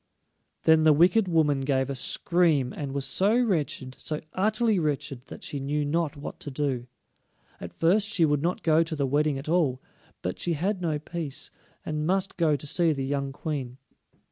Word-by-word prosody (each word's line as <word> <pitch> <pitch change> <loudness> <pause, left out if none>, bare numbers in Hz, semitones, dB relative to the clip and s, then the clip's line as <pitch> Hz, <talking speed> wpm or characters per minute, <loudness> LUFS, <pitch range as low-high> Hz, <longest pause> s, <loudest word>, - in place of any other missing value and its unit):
Then 160 0 +5
the 155 -1 +6
wicked 180 +7 +4
woman 155 -5 +2
gave 135 -1 +1
a 140 - -3
scream, 155 -2 +1
and 140 -2 -5
was 140 0 -2
so 200 - +3
wretched, 150 - -1
so 155 -1 -2
utterly 215 +1 +1
wretched, 140 -4 -3
that - - -10
she 145 - -4
knew 145 +2 -1
not 155 0 -1
what 145 - -7
to - - -6
do. 130 -3 -2 0.7
At 90 - -7
first 195 +6 +2
she 170 -6 +3
would 145 -2 +1
not 175 +3 -1
go 160 0 +4
to 165 -1 -2
the 140 -2 0
wedding 145 +1 +1
at 135 - -7
all, 155 -6 +1 0.4
but 90 - -3
she 175 - 0
had 185 +5 -1
no 160 -4 0
peace, 155 -2 -5 0.3
and 155 0 -2
must 190 +1 0
go 160 -4 +2
to 145 - -7
see 165 +3 +2
the 135 -2 -3
young 140 0 -2
Queen. 135 -4 -5
150 Hz, 190 wpm, -27 LUFS, 140-170 Hz, 0.7 s, the